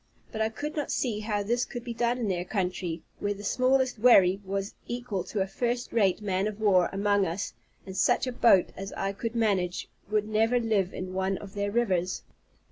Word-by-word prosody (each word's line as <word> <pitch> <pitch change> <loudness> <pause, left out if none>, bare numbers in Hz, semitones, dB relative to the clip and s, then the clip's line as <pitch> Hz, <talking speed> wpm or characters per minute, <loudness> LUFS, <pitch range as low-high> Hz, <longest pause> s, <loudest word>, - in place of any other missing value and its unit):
But 220 - -3
I 220 - +2
could 295 +7 -5
not 295 -2 -2
see 230 -5 -1
how 210 -1 -1
this 240 +4 +1
could 240 -2 -6
be 240 - -5
done 240 +1 +1
in 235 -3 -2
their 180 -2 -1
country, 180 -4 -2 0.2
where 205 0 -1
the 205 - -10
smallest 255 +2 +2
wherry 195 -5 +6
was 195 +1 -3
equal 240 -6 -3
to 205 - -2
a - - +2
first 240 +5 -2
rate 205 -3 +2
man 195 0 0
of 215 0 -5
war 190 -5 +4
among 200 0 +2
us; 175 +5 -3 0.3
and 190 - -8
such 195 - +3
a 255 - -2
boat 230 -6 +4
as 195 +1 -6
I 195 0 -2
could 230 +3 -4
manage 195 -6 0 0.2
would 210 0 +1
never 225 +3 +2
live 210 -5 +1
in 185 0 -6
one 190 0 0
of 195 -1 -10
their 205 0 -1
rivers. 185 -6 0
205 Hz, 210 wpm, -28 LUFS, 190-235 Hz, 0.3 s, wherry